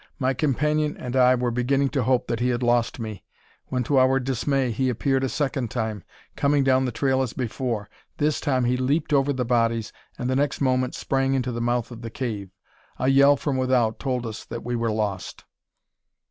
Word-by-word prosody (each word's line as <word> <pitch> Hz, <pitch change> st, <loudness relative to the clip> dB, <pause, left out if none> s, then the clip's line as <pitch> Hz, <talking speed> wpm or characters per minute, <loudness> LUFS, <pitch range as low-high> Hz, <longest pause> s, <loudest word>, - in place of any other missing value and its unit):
My 130 Hz, -2 st, +1 dB
companion 150 Hz, +2 st, 0 dB
and 125 Hz, 0 st, -5 dB
I 130 Hz, 0 st, +5 dB
were 120 Hz, -1 st, -1 dB
beginning 135 Hz, +3 st, +1 dB
to 135 Hz, -, -1 dB
hope 125 Hz, +1 st, +2 dB
that 115 Hz, -, -2 dB
he 125 Hz, +1 st, +1 dB
had 120 Hz, 0 st, -1 dB
lost 120 Hz, 0 st, +1 dB
me, 110 Hz, -4 st, -6 dB, 0.4 s
when, 125 Hz, -1 st, -1 dB
to 135 Hz, +2 st, +2 dB
our 130 Hz, +1 st, +4 dB
dismay, 135 Hz, 0 st, 0 dB
he 130 Hz, +4 st, 0 dB
appeared 135 Hz, +2 st, 0 dB
a 135 Hz, -, 0 dB
second 135 Hz, -4 st, -1 dB
time, 110 Hz, -5 st, -3 dB, 0.3 s
coming 140 Hz, 0 st, +2 dB
down 130 Hz, 0 st, +3 dB
the 125 Hz, -, -1 dB
trail 130 Hz, +2 st, +1 dB
as 125 Hz, -4 st, -2 dB
before. 120 Hz, -3 st, -3 dB, 0.3 s
This 150 Hz, +1 st, 0 dB
time 130 Hz, -4 st, +1 dB
he 125 Hz, +1 st, +1 dB
leaped 145 Hz, +5 st, 0 dB
over 140 Hz, 0 st, +3 dB
the 130 Hz, -2 st, -1 dB
bodies, 115 Hz, -2 st, +1 dB, 0.2 s
and 125 Hz, -, -3 dB
the 130 Hz, -, 0 dB
next 140 Hz, 0 st, 0 dB
moment 130 Hz, -2 st, +1 dB
sprang 135 Hz, 0 st, 0 dB
into 130 Hz, -1 st, -1 dB
the 115 Hz, 0 st, -4 dB
mouth 120 Hz, 0 st, 0 dB
of 115 Hz, -1 st, -9 dB
the 115 Hz, -, -6 dB
cave. 110 Hz, -5 st, -4 dB, 0.5 s
A 130 Hz, -, +1 dB
yell 140 Hz, +1 st, +6 dB
from 145 Hz, -2 st, -2 dB
without 125 Hz, -4 st, +1 dB
told 125 Hz, -3 st, -2 dB
us 110 Hz, -2 st, -6 dB
that 115 Hz, 0 st, -7 dB
we 120 Hz, +1 st, -2 dB
were 115 Hz, -1 st, 0 dB
lost. 105 Hz, -3 st, -3 dB
130 Hz, 205 wpm, -24 LUFS, 120-135 Hz, 0.5 s, yell